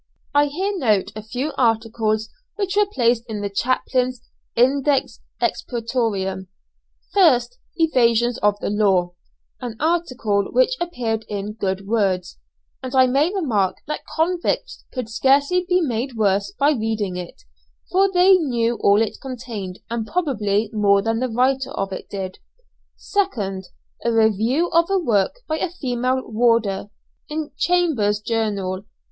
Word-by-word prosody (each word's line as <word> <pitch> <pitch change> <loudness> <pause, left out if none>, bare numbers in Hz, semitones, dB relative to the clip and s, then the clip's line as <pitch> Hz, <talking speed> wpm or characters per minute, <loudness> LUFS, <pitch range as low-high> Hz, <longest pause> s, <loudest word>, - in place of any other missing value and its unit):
I 290 0 +4
here 375 +8 -2
note 215 - +1
a 215 - -5
few 250 +8 -4
articles 220 -2 +1 0.3
which 395 -2 -2
were 415 0 +4
placed 235 - +2
in 215 -2 -4
the 200 -1 -3
chaplain's 255 +2 0 0.3
Index 270 +3 +2 0.2
Expurgatoriam, 220 -6 -2 0.7
1st 345 - +4 0.2
"Evasions 240 -7 +2
of 205 0 +2
the - - -1
Law," 190 -4 +2 0.5
an 245 -3 -5
article 255 - 0
which - - +3
appeared 235 -10 -2
in 205 0 -4
"Good 195 -2 -3
Words," 195 - 0 0.4
and 260 +1 -5
I 260 0 +7
may 275 +7 +2
remark 230 - 0
that 300 - -4
convicts 350 +8 -1
could 255 -4 -4
scarcely 280 +10 +2
be 360 0 +3
made 250 -3 -2
worse 200 -2 +1
by 285 +2 +4
reading 220 -7 -1
it, 180 -1 -8 0.5
for 385 +1 +3
they 370 +1 +6
knew 240 -7 0
all 205 +2 +5
it 220 - -5
contained 230 -8 -6
and 230 -1 -3
probably 215 - 0
more 200 -2 +3
than 225 +1 0
the 255 +1 -1
writer 260 +3 +1
of 195 -1 -3
it - - -7
did. 190 -2 -5 0.8
2nd 205 - 0 0.4
A 235 - +1
review 225 - +2
of 335 +1 +3
a 390 - +2
work 240 - +1
by 315 0 -1
a 365 - -1
female 255 -5 -1
warder, 225 -3 +1 0.4
in 305 0 -4
"Chambers's 290 -14 +1
Journal." 210 -4 -2
235 Hz, 140 wpm, -21 LUFS, 210-290 Hz, 0.8 s, I